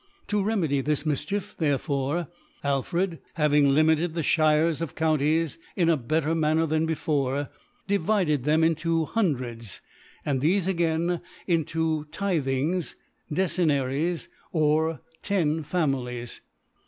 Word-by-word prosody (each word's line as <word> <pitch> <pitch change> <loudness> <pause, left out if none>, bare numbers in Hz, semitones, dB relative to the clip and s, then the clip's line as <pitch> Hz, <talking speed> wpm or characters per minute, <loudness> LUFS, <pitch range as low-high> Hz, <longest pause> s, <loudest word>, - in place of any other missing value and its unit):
To 210 -1 +1
remedy 180 -10 +1
this 150 +1 0
Mifchicf, 160 +7 -2
therefore, 145 +1 0 0.4
AlfredhsLv^ 155 +1 -1
ing 145 -1 +5
limited 160 +3 +3
the 165 - -1
Shires 155 +1 +3
or 165 - 0
G>unties 160 +1 +1 0.2
in 170 -3 +2
a 165 - +5
bet 155 +4 0
ter 155 +3 0
Manner 160 0 +2
than 160 +1 +1
before, 145 -3 -1 0.4
divided 185 - +1
them 155 +3 +3
into 165 0 +1
HuQflreds, - - -15
Hundreds, 125 - -2 0.4
and 135 -3 0
thtfe 180 +5 +2
again 170 -1 0 0.3
mto 160 -2 0
Tithings, 160 -2 -1 0.4
Decennaries, 160 -2 0 0.2
or 155 -1 +1 0.2
ten 165 -6 +1
Families 130 -7 -2
♦. - - -42
155 Hz, 120 wpm, -26 LUFS, 145-170 Hz, 0.4 s, ing